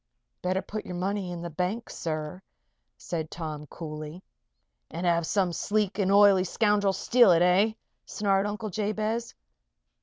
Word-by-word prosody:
"Better 185 +1 -1
put 210 +2 -5
your 180 - -7
money 190 +1 -2
in 175 -1 -6
the 170 - -5
bank, 185 +8 -2
sir," 155 +2 -4 0.6
said 160 -3 -4
Tom, 155 -3 -6
coolly. 155 +3 -8 0.7
"And 170 +3 -5
have 170 -1 +2
some 185 -4 +1
sleek 210 +2 -1
and 195 -1 +2
oily 200 -2 +6
scoundrel 205 +1 +2
steal 235 0 +5
it, 170 +1 +4
eh?" 190 +5 +4 0.3
snarled 200 -1 +1
Uncle 210 0 -4
Jabez. 215 +3 -2
190 Hz, 145 wpm, -27 LUFS, 170-210 Hz, 0.7 s, oily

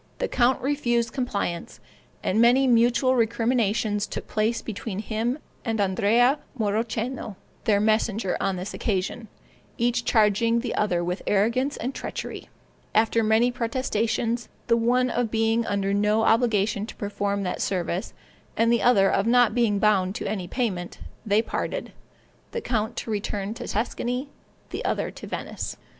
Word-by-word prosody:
The - - -1
count 255 - +2
refused 240 -4 0
compliance, 200 -9 -3 0.4
and 215 +4 +2
many 245 +3 +5
mutual 245 +1 +4
recriminations 225 -3 +1
took - - -6
place 220 +2 0
between 215 -2 -5
him 225 +4 -1 0.3
and 225 -2 -1
Andrea 230 +8 +3 0.2
Mauroceno, 220 +1 -2 0.3
their 205 -2 +3
messenger 215 -2 +1
on 195 - 0
this 185 +2 -5
occasion, 215 +2 -2 0.5
each 240 +1 +1
charging 230 +1 +3
the 250 - -3
other 180 -5 +1
with 180 +2 -2
arrogance 235 +8 +1
and 255 +4 -3
treachery: - - -6 0.5
after 225 +1 +3
many 220 +3 +3
protestations, 235 -1 -1 0.2
the 230 - +3
one 245 +2 +2
of 245 -2 0
being 225 +1 +1
under 200 -1 0
no 210 +2 +2
obligation 220 -3 +2
to - - -9
perform 200 -1 -2
that 180 - -3
service, 180 -1 -2 0.4
and 230 +1 +4
the 235 - +2
other 200 -6 +5
of 195 +3 +1
not 245 -1 +5
being 230 -4 +2
bound 195 -2 +2
to - - -4
any 190 -4 -3
payment, 185 -7 -2 0.3
they 215 0 +2
parted, - - -4 0.6
the 470 - -2
count 225 - -1
to 230 - -4
return 205 0 -2
to 230 - -7
Tuscany, 245 +5 -2 0.4
the - - -4
other - - -1
to - - -10
Venice. - - -5
225 Hz, 150 wpm, -25 LUFS, 205-240 Hz, 0.6 s, many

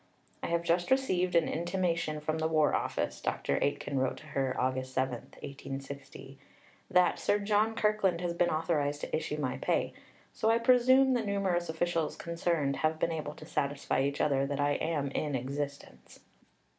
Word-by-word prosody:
"I - - -3
have 170 0 0
just 170 +1 +1
received 185 -10 +2
an 170 - +4
intimation 170 -2 -1
from 155 +1 -1
the 160 - +1
War 155 -2 +3
Office," - - -1
Dr. - - -1
Aitken 140 -1 -1
wrote 130 0 0
to - - -13
her 135 -2 -1
(Aug. 130 0 0
7, 130 0 -1
1860), 135 +1 -8 0.5
"that 180 0 +3
Sir 205 - +2
John 210 +2 +1
Kirkland 210 -5 +2
has 175 -1 -2
been 175 0 +2
authorised 150 -3 0
to - - -2
issue 155 -1 -2
my 130 -3 -2
pay; - - 0 0.4
so 220 - +1
I 225 - +5
presume 255 +2 +5
the 245 - +1
numerous 195 -4 0
officials 165 0 -1
concerned 170 -4 -1
have 155 0 +1
been 165 - 0
able 150 -2 -4
to 155 - -11
satisfy 140 -3 -1
each 140 +1 -1
other 140 -1 +2
that 140 0 -3
I 145 0 +2
am 145 -2 -1
in 145 -1 -1
existence. 140 - -5
155 Hz, 170 wpm, -31 LUFS, 140-180 Hz, 0.5 s, I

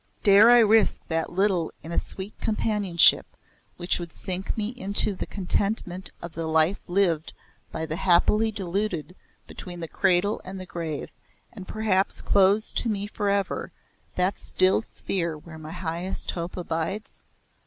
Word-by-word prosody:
Dare 205 +3 +7
I 245 - +8
risk 220 -1 +4
that 165 -1 -1
little 185 -3 +1
in 165 - -8
a - - +1
sweet 195 +2 -8
companionship 210 -6 +3 0.4
which 175 +1 +1
would 170 -1 -7
sink 185 +5 -5
me 215 -1 -1
into 210 -4 -1
the 185 - -6
contentment 190 -1 -2
of 170 -1 -7
the 165 -1 -4
life 160 +4 +2
lived 175 -4 0 0.4
by 160 - -3
the 160 0 -4
happily 210 +5 +3
deluded 190 -3 -3 0.3
between 175 -2 -9
the 165 - -5
cradle 190 +4 +1
and 190 +1 -8
the 185 - -7
grave 165 -4 -5 0.4
and 195 -5 -10
perhaps 205 -3 0
close 200 +2 +2
to 235 - -1
me 205 -2 -2
for 205 0 -2
ever 200 -1 -1 0.4
that 185 +2 0
still 185 +3 +5
sphere 170 -7 -1
where 160 +1 -12
my 155 0 -9
highest 175 +1 -4
hope 170 +1 -6
abides? 170 +4 -3
185 Hz, 155 wpm, -25 LUFS, 170-205 Hz, 0.4 s, I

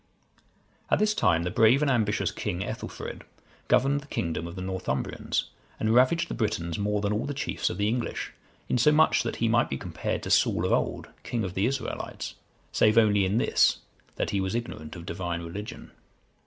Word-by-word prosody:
] - - -37
At - - +4
this 215 0 +2
time, 85 - +2
the 90 - -2
brave 115 +8 +5
and 140 - +2
ambitious 110 -4 +1
king, 95 -4 -3
Ethelfrid,(139) - - -6 0.5
governed 140 +2 +3
the 145 - -15
kingdom 85 - -2
of 85 - -8
the 95 - -6
Northumbrians, 95 -8 -2 0.3
and 110 0 +1
ravaged 130 +8 +4
the - - -5
Britons 85 -7 -2
more 105 0 0
than 105 0 0
all 110 +5 -1
the 145 - -3
chiefs 145 - -1
of 90 - -5
the 100 0 +1
English, 115 +2 -2 0.3
insomuch 150 +6 +4
that - - -3
he 115 - 0
might 120 +1 +3
be 70 - -2
compared - - -3
to - - -3
Saul - - +3
of - - 0
old, - - 0
king 115 -2 -2
of 90 -2 -3
the 95 +5 +1
Israelites, 135 0 -4 0.4
save 110 +1 +3
only 105 -3 +5
in 95 +4 +1
this, - - +3 0.4
that - - -2
he 100 - 0
was 95 +3 -2
ignorant 80 -10 -5
of 85 -1 -9
Divine 85 0 -3
religion. 100 +6 -7
105 Hz, 195 wpm, -27 LUFS, 90-120 Hz, 0.5 s, brave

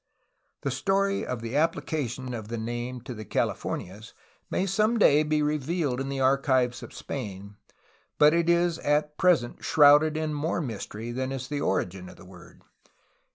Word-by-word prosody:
The 140 - -2
story 195 +9 0
of 125 -3 -4
the 115 +3 -4
application 140 -5 -1
of 110 -3 -6
the 115 +1 -4
name 120 +2 -4
to 125 - -7
the 110 -2 -8
Califor - - -1
nias 100 +5 -13 0.4
may 185 - 0
some 215 +5 +1
day 150 -8 +5
be 155 0 +1
revealed 150 -2 -1
in 135 - -4
the 135 -1 -3
archives 130 -2 +2
of - - -10
Spain, 100 -6 -7 0.6
but 150 +1 +6
it 170 0 +2
is 170 -1 +2
at 150 +1 0
present 170 -10 +2
shrouded 150 +1 +5
in 155 -1 -2
more 155 +4 -1
mystery 115 -4 -5
than 130 +2 -3
is 130 -1 -5
the 145 0 -3
origin 95 -3 -2
of - - -13
the - - -15
word. 90 -1 -15
135 Hz, 170 wpm, -27 LUFS, 120-155 Hz, 0.6 s, but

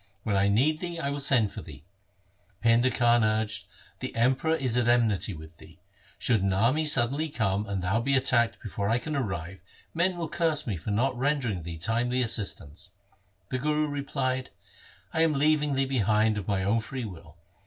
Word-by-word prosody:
When 105 -3 0
I 100 0 +3
need 135 +10 +2
thee, 175 -1 -5
I 140 -3 -2
will 145 - -3
send 125 -7 +2
for - - -7
thee.' 75 -4 -12 0.8
Painda 115 +2 +5
Khan 120 -2 +3
urged, 110 -1 -1 0.3
'The - - -6
Emperor 130 +7 +2
is 130 -7 -1
at 125 -1 +2
enmity 110 -6 +2
with 80 +1 -12
thee. 80 +2 -16 0.4
Should 115 -5 +2
an 95 0 +1
army 125 +11 +2
suddenly 140 +3 +1
come 105 -6 -1
and 100 -2 -3
thou 95 +5 +1
be 135 +3 +1
attacked 120 -3 +2
before 100 -1 -3
I 115 - +3
can 155 +4 -4
arrive, 95 - -3 0.3
men 175 +2 +1
will 165 -2 -3
curse 160 -1 0
me 110 - -2
for 85 +5 -6
not 120 +6 +1
rendering 125 - 0
thee 85 0 -7
timely 120 +8 0
assist 110 -3 0
ance.' 90 +6 -11 0.6
The 130 - -2
Guru 150 +2 +1
replied, 135 -2 -2 0.3
' 95 +1 -25
I 160 - +1
am 165 -1 +3
leaving 150 0 +2
thee 135 0 +1
behind 110 -4 +2
of 95 - -8
my 100 -2 0
own 105 +4 +2
free 120 +2 -5
will. 90 -6 -11
120 Hz, 195 wpm, -27 LUFS, 100-140 Hz, 0.8 s, Painda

